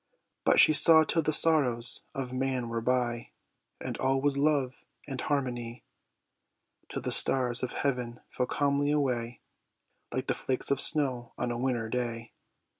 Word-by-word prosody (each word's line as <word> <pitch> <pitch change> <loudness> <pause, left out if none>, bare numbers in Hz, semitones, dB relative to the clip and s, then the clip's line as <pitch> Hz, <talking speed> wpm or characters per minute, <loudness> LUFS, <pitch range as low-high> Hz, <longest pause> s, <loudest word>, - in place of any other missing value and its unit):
But - - +3
she 155 - +6
saw 160 +1 +7
till 165 +1 0
the 155 - -1
sorrows 130 -7 +3
of 130 -2 -5
man 130 -2 -2
were 115 0 -3
by, 120 -1 -2 0.5
And - - -6
all 135 +1 0
was 140 0 +1
love 140 -3 -1 0.2
and 135 -3 -6
harmony; 125 -4 -4 1.1
Till - - -6
the - - -3
stars 125 -2 +1
of 125 - -4
heaven 125 -4 -3
fell 125 - -3
calmly 145 +1 0
away, 125 -5 -2 0.7
Like - - -3
the - - -1
flakes 130 +1 -3
of 140 - +2
snow 130 -6 +2
on 120 - -3
a 120 - -4
winter 120 -3 -2
day. 115 -1 -4
130 Hz, 155 wpm, -28 LUFS, 120-140 Hz, 1.1 s, saw